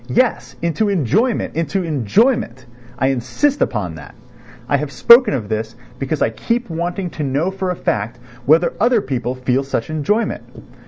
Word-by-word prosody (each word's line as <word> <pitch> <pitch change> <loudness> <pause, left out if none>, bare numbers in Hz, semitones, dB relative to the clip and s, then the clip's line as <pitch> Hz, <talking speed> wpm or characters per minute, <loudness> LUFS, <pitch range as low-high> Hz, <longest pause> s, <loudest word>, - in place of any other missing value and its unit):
Yes, 255 0 0
into 170 +6 +1
enjoyment, 200 - 0
into 165 +4 -1
enjoyment! 155 - +1 0.3
I 130 - +2
insist 135 - 0
upon 100 -9 -1
that. 75 - -12 0.5
I - - +2
have 150 -2 -4
spoken 235 - +6
of 110 -6 -4
this 110 +1 -3 0.2
because 135 +2 -1
I - - +1
keep 235 - -2
wanting 175 +2 -3
to 150 - -5
know 145 +7 0
for 190 -1 -3
a 180 - -1
fact 105 -6 -2 0.3
whether 165 +4 +4
other 240 +2 +4
people 125 -5 -3
feel 130 +1 0
such 135 0 -3
enjoyment? 205 - 0
155 Hz, 160 wpm, -19 LUFS, 130-200 Hz, 0.5 s, spoken